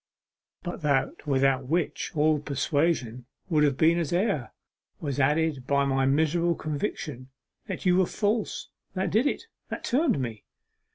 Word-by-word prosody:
But 175 -1 -5
that 150 +2 0
without 135 -2 +2
which 170 +3 -1
all 155 0 +3
persuasion 140 -4 -1 0.2
would 155 -3 +3
have 140 -3 +2
been 165 +3 +4
as 165 -4 -2
air, 175 - 0 0.5
was 140 -3 -3
added 150 -1 +1
by 140 0 +3
my 135 -1 +2
miserable 160 +4 +2
conviction 145 - -4 0.4
that - - -5
you 180 0 +4
were 185 -2 +3
false; 210 +1 -1 0.3
that 185 -2 -1
did 230 +7 +3
it, - - -2 0.3
that - - -5
turned 260 - +2
me! 115 -4 -4
150 Hz, 150 wpm, -27 LUFS, 135-175 Hz, 0.5 s, been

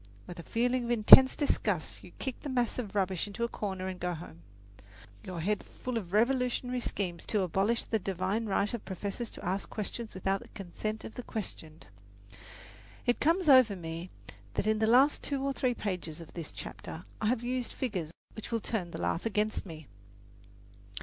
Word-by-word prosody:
With 175 - -9
a 170 - -10
feeling 245 +1 +1
of - - -4
intense 240 +3 +9
disgust 205 - -1
you - - -11
kick 265 -2 -4
the 290 - -5
mass 245 -2 0
of 210 -4 -5
rubbish 190 -1 +1
into 220 +3 -4
a - - +2
corner 190 -5 -4
and 185 -1 -5
go 180 0 -1
home, 120 - -10 0.8
your 180 -3 -5
head 205 +4 0 0.2
full 255 -1 -2
of 195 -6 -3
revolutionary 250 +2 +1
schemes 185 -7 -3
to 210 - +1
abolish 195 +6 +1
the 220 - -1
divine 195 +4 -1
right 205 +2 +1
of 235 - -4
professors 200 +5 -4
to - - -9
ask 190 +3 -2
questions 220 +1 -4
without 195 +1 0
the - - -12
consent 215 +3 -4
of - - -8
the - - -6
questioned. 165 -9 -6 1.2
It 245 - +2
comes 335 +3 +2
over 255 -7 +7
me 165 0 -6 0.5
that - - 0
in 215 0 +2
the 220 - +3
last 260 +6 +5
two 275 -2 -2
or 275 0 0
three 255 -2 0
pages 180 -7 -4
of 165 - -11
this 165 -3 -6
chapter 170 - -8 0.2
I 215 - +1
have 240 +1 +1
used 250 0 -2
figures 190 - -3 0.3
which 220 - -7
will 230 - +1
turn 200 -5 -2
the - - -7
laugh 85 - 0
against 210 -1 -1
me. 160 -3 -9
210 Hz, 190 wpm, -31 LUFS, 185-240 Hz, 1.2 s, intense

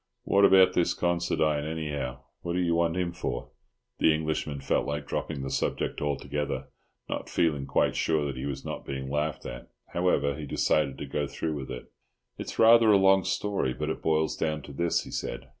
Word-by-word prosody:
What 100 0 +4
about 95 -1 +6
this 90 - +2
Considine, 85 -4 +1
anyhow? 75 -5 -4 0.2
What 85 - -3
do 90 - 0
you 85 -2 +2
want 85 +1 +1
him 90 -1 0
for?" - - -4 0.5
The - - +5
Englishman 75 -2 -2
felt 70 - 0
like 75 0 -3
dropping 70 - -3
the 65 - -4
subject - - -1
altogether, 75 0 -2 0.4
not - - -4
feeling 75 -5 +1
quite - - +2
sure 80 -2 +1
that 70 -2 -3
he 65 +2 -4
was 70 -1 -5
not - - -5
being 65 0 -5
laughed 75 +1 -2
at. - - -7 0.2
However, 85 -5 +1
he 75 0 -7
decided 70 0 +1
to - - -5
go 75 -1 -2
through 80 +3 -3
with 70 -3 -5
it. 65 - -8 0.5
"It's - - -6
rather 115 0 +7
a 100 - +7
long 95 0 +5
story, 100 -14 -1
but - - -2
it - - -5
boils 80 -1 +1
down 75 -2 -2
to 70 - -10
this," 85 +3 +1
he - - -10
said. 65 - -4
75 Hz, 195 wpm, -28 LUFS, 70-85 Hz, 0.5 s, rather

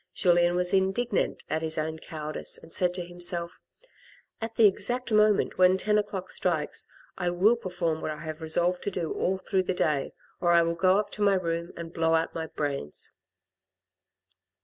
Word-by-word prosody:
Julien 175 -1 +3
was 180 +1 0
indignant 195 +3 +1
at 160 - -1
his 160 -1 -3
own 160 +1 -2
coward 155 -1 -6
ice, - - -4
and - - -15
said 180 +1 +1
to 180 -1 -3
himself, 175 -1 -1 0.4
" - - -27
at 225 0 -4
the 225 - +6
exact 240 +5 +1
moment 215 -2 +3
when 185 +1 +6
ten 210 +2 +2
o'clock 200 -3 -4
strikes, - - -2 0.3
I 180 -1 +1
will 190 +7 +4
perform 175 -7 -2
what - - -3
I 155 - -4
have 155 0 -6
resolved 175 +3 0
to - - +1
do 175 -4 -3
all 190 +1 0
through 190 0 0
the 185 0 -2
day, 150 -5 0 0.3
or 175 -1 +3
I 170 0 +6
will 165 0 0
go 185 +3 +3
up 205 -1 -1
to 210 - -7
my 200 -1 +4
room 170 -1 -2
and 170 0 -7
blow 165 0 +2
out 160 0 0
my 160 -1 -4
brains." 140 - -4
175 Hz, 195 wpm, -28 LUFS, 165-190 Hz, 0.4 s, the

